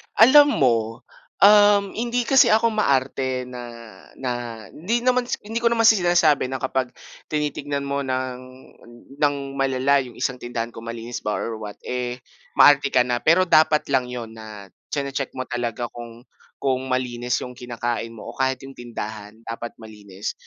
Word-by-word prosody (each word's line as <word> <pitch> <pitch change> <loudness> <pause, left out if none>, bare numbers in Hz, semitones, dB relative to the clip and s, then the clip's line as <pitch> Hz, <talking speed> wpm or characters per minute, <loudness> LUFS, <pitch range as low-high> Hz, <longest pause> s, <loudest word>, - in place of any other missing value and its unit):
Alam 285 +6 +8
mo, 115 -2 +1 0.4
um, 205 -1 +6
hindi 240 +1 -1
kasi 255 0 +5
ako 225 +1 +3
maarte 130 -9 0
na 125 -1 -8 0.5
na 130 - -4 0.4
hindi 230 +9 -2
naman 250 -1 +2
sa - - -1
hindi 225 +3 -3
ko 235 - +2
naman 230 -1 +2
sinasabi 175 - +4
na 130 0 -5
kapag 130 -1 -2 0.3
tinitignan 145 -2 -2
mo 140 0 -2
ng 130 -1 -3 0.8
ng 145 -1 +2 0.2
malala 135 +1 +2
'yong 125 -4 -7
isang 125 -1 -2
tindahan 120 -1 -4
kung 115 0 -10
malinis 115 +1 -6
ba 105 - -2
or 115 -1 -4
what, 105 -2 -7
eh, 125 0 -4 0.3
maarte 145 -1 +6
ka 125 - +5
na. 120 -1 -1
Pero 165 +7 +4
dapat 155 -3 +4
lang 130 -2 +2
'yon 120 -2 -6
na 110 -3 -11 0.2
chine-check 140 -1 -3
mo 130 - -3
talaga 120 -1 -4
kung 120 0 -10 0.4
kung 130 -1 -1
malinis 125 -1 -1
'yong 125 - -8
kinakain 120 -1 -4
mo 110 - -9
o - - -18
kahit 130 0 -1
'yong 135 - -10
tindahan 110 -3 -7
dapat 115 +1 -7
malinis. 105 -3 -8
130 Hz, 160 wpm, -23 LUFS, 120-155 Hz, 0.8 s, Alam